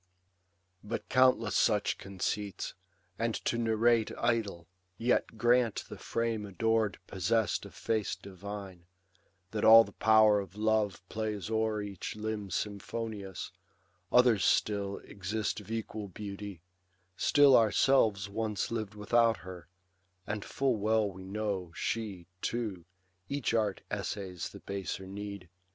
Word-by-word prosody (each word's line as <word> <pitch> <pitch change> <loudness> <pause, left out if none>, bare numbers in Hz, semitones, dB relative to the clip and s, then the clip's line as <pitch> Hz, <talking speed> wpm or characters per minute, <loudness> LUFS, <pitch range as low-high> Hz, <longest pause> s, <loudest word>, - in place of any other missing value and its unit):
But 105 +2 -5
countless 130 -5 +4
such 105 -3 +2
conceits, 100 +1 -3 0.5
and 115 -1 0
to - - +1
narrate 115 0 +3
Idle; 110 -8 -1 0.3
yet 115 0 +1
grant 120 0 +3
the - - -7
frame 115 -2 -1
ador'd 110 +2 0
possess'd 105 +4 0
Of - - -16
face 110 -2 -1
divine, 95 -2 -9 0.6
that 110 - -2
all 115 +1 +10
the 100 - -11
power 110 -1 +5
of 95 -2 -7
love 105 -3 0
Plays 105 -2 -3
o'er 110 -1 0
each 100 -1 -6
limb 105 -2 -4
symphonious, 100 0 -4 0.6
others 125 -5 +5
still 100 -2 +1
Exist 105 +2 -3
of 105 -1 -13
equal 110 -2 -4
beauty; 100 -2 -7 0.5
still 145 +3 +6
ourselves 110 -3 +4
Once 105 0 -2
liv'd 110 -3 -3
without 115 +1 +3
her; 90 -4 -9 0.6
and 105 0 -3
full 135 -4 0
well 110 0 +2
we 95 0 -10
know 100 -3 -3
She, 105 -6 -3 0.2
too, 105 -8 -3 0.4
each 140 -4 -1
art 105 -4 +1
essays 95 -4 -4
the - - -12
baser 95 -1 -4
need. 100 -1 -7
105 Hz, 125 wpm, -31 LUFS, 100-115 Hz, 0.6 s, all